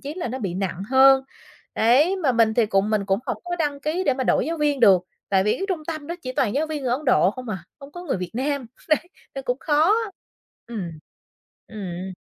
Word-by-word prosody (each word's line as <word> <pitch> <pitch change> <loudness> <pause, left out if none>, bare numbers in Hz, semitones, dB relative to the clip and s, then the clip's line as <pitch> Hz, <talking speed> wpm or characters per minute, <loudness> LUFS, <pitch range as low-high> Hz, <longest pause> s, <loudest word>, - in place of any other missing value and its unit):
chí 285 +2 -6
là 345 -8 -4
nó 255 - -4
bị 195 -8 -3
nặng 190 -1 -3
hơn. 270 0 +6 0.5
Đấy, 275 - +4
mà 305 -9 +1
mình 225 -2 +3
thì 235 -2 +3
cũng 200 0 +1
mình 210 -2 +1
cũng 195 0 +2
hổng - - -3
có 350 0 -3
đăng 290 -4 -1
ký 310 +5 -1
để 275 - +3
mà 260 0 -2
đổi 245 - +2
giáo 330 +1 -2
viên 295 -3 0
được, 190 -6 +6 0.3
tại 190 -1 +2
vì 210 - +3
cái 390 - -2
trung 335 -5 -2
tâm 310 -3 -5
đó 340 - -4
chỉ 255 - -4
toàn 230 -4 0
giáo 300 +3 +1
viên 310 -2 -4
người 250 -2 0
Ấn 275 +5 -2
Độ 245 -8 +4
không 250 +3 -9
à, 200 -3 -3 0.2
không 280 0 -12
có 350 - -8
người 285 - -1
Việt 180 -1 -5
Nam. 275 0 -1 0.2
Đấy, 310 - +4 0.4
nên 270 - -6
cũng 250 0 -1
khó, 315 +6 +3 0.7
ừm, 205 -8 -5 0.8
ừm. 190 -3 -6
260 Hz, 240 wpm, -23 LUFS, 210-300 Hz, 0.8 s, hơn